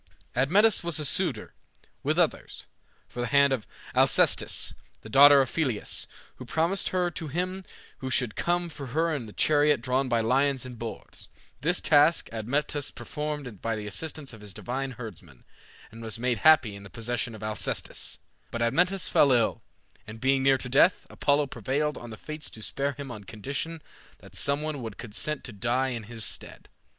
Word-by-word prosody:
Admetus 190 - +4
was 170 -2 0
a 150 - -1
suitor, 140 - 0 0.5
with - - 0
others, - - 0 0.4
for 120 - -6
the 120 - -1
hand 140 +1 +4
of 120 -5 -3 0.3
Alcestis, - - +3 0.3
the 110 - -11
daughter 140 +4 +8
of 130 - -2
Pelias, 130 -10 -2 0.3
who - - -8
promised 165 +9 0
her 180 -1 0
to 160 -1 -5
him 185 +5 -3 0.4
who 130 - -4
should 125 -4 +1
come 175 0 0
for 145 -4 -8
her 160 +6 +1
in 120 -7 -4
a - - -10
chariot 150 +2 +3
drawn 130 +2 0
by 120 - +2
lions 130 +3 +2
and 125 -2 -9
boars. 115 -1 -8 0.3
This 175 +5 +2
task 150 +2 +4
Admetus 140 +6 -1
performed 145 -4 -5
by 115 -1 -1
the 105 -1 -5
assistance 145 +6 -5
of 110 - -12
his 100 -3 -8
divine 130 +2 -3
herdsman, 90 - -10 0.5
and 115 - -11
was 110 -1 -4
made 120 -1 0
happy 155 -9 +5
in 100 - -10
the 100 - -11
possession 115 0 -3
of 110 - -10
Alcestis. 110 0 -3 0.3
But 115 0 -2
Admetus 180 +10 +2
fell 140 - +4
ill, 120 -3 +2 0.5
and 110 +1 -9
being 135 +1 +2
near 135 0 +4
to 125 - -5
death, 140 +8 +4
Apollo 145 +1 +2
prevailed 140 +4 -2
on 120 - -9
the 110 - -8
Fates 155 +3 -7
to 110 - -11
spare 140 +4 -2
him 140 -2 -7
on 105 -4 -9
condition 140 +10 -5 0.3
that - - -16
some 140 +1 0
one 155 -3 -3
would 110 -3 -6
consent 130 +6 -3
to 120 - -6
die 120 +5 0
in 115 -4 -5
his 115 -3 -3
stead. - - -4
135 Hz, 180 wpm, -27 LUFS, 115-150 Hz, 0.5 s, daughter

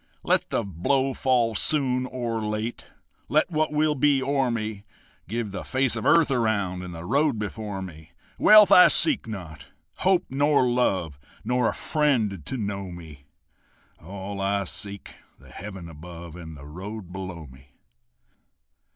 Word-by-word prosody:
Let - - +1
the - - 0
blow 130 - 0
fall 120 -3 +1
soon 130 +1 +1
or 120 -3 -3
late, 105 +2 -3 0.4
Let 155 +4 +2
what 155 -1 0
will 150 0 +2
be 145 0 +3
o'er 135 -1 +1
me; 110 -3 -3 0.4
Give 110 +1 -3
the 95 - -5
face 130 -2 0
of 115 - -2
earth 165 -4 +5
around 100 -7 0
And 90 -1 -7
the 85 +1 -8
road 140 - +2
before 105 -2 -5
me. 80 -2 -11 0.3
Wealth 210 -2 +8
I 180 - +9
seek 290 - +2
not, 80 - -8 0.3
hope 185 -1 +2
nor 145 -1 +2
love, 95 - 0 0.2
Nor 125 -2 +1
a - - -4
friend 115 - 0
to 130 - -5
know 100 -3 -3
me; 80 -5 -11 0.8
All 100 +3 -6
I 100 0 0
seek, 100 +1 -6 0.2
the - - -18
heaven 95 -3 -8
above 85 +1 -10
And 80 -3 -9
the 70 - -12
road 95 +5 -8
below 95 -4 -6
me. 65 0 -16
105 Hz, 150 wpm, -25 LUFS, 90-130 Hz, 0.8 s, I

